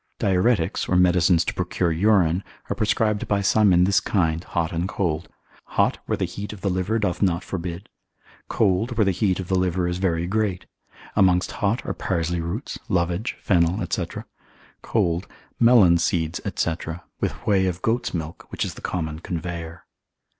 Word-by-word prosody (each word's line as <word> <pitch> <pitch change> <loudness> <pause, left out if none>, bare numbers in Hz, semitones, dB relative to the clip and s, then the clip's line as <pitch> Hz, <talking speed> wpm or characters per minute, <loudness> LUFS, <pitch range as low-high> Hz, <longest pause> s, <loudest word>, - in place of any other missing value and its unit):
Diuretics, 95 0 +1
or 90 - +2
medicines 90 -1 +4
to - - -2
procure 90 -1 -1
urine, 90 0 +3 0.3
are - - 0
prescribed 105 -1 0
by 100 - +1
some 105 0 +4
in 90 0 +5
this 100 +2 +4
kind, 85 -4 0
hot 85 -3 -2
and 85 +2 -2
cold: 85 -5 -2 0.5
hot - - +3
where - - 0
the - - 0
heat 100 +4 -6
of 105 -3 -10
the 100 - 0
liver 95 +5 0
doth 100 -5 -1
not 90 -2 +1
forbid; 90 -2 -5 0.6
cold 110 +3 +1
where 110 - +4
the 95 - +3
heat 95 0 0
of 95 - -5
the 95 - -2
liver 90 -1 0
is 90 0 -2
very 85 -3 0
great: 95 -2 -1 0.5
amongst 90 -2 +3
hot 105 +3 -1
are - - -2
parsley 85 -2 -1
roots, 90 +11 -4
lovage, 90 +2 0
fennel, 85 -2 +2
&c.: - - -1 0.7
cold, 85 +2 0 0.3
melon 110 -8 +6
seeds, 85 -1 0
&c., 85 - +1 0.5
with - - -1
whey 95 -2 +3
of 90 0 -3
goat's 115 +2 0
milk, 80 -2 -6
which - - -2
is - - -5
the - - -12
common 80 -4 -3
conveyer. 85 0 -6
90 Hz, 170 wpm, -23 LUFS, 85-100 Hz, 0.7 s, melon